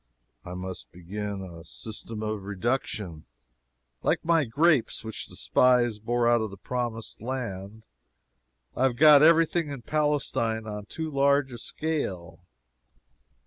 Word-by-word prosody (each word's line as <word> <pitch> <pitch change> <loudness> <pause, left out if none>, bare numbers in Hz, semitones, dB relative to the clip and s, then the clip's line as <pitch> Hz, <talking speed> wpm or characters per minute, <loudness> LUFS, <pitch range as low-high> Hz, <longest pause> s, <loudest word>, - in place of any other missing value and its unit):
I 90 - -7
must 90 -9 -7
begin 100 +3 -5
a 85 -3 -10
system 110 +3 -7
of 110 -1 -2
reduction. 100 -5 -3 0.8
Like - - 0
my 165 -3 +3
grapes 145 +1 +2
which 110 -1 -6
the - - -12
spies 120 -4 +3
bore 120 +2 +1
out 120 -1 +4
of 110 - -2
the 100 - -10
Promised 120 -1 -4
Land, 110 -4 -5 0.9
I - - -3
have 130 -3 +1
got 150 +2 +8
every 165 +1 +7
thing 165 -1 -1
in 135 -4 -7
Palestine 140 -7 0
on 105 -1 -6
too 160 -1 -5
large 140 -1 +2
a 120 - -7
scale. 90 - -4
115 Hz, 140 wpm, -27 LUFS, 100-140 Hz, 0.9 s, got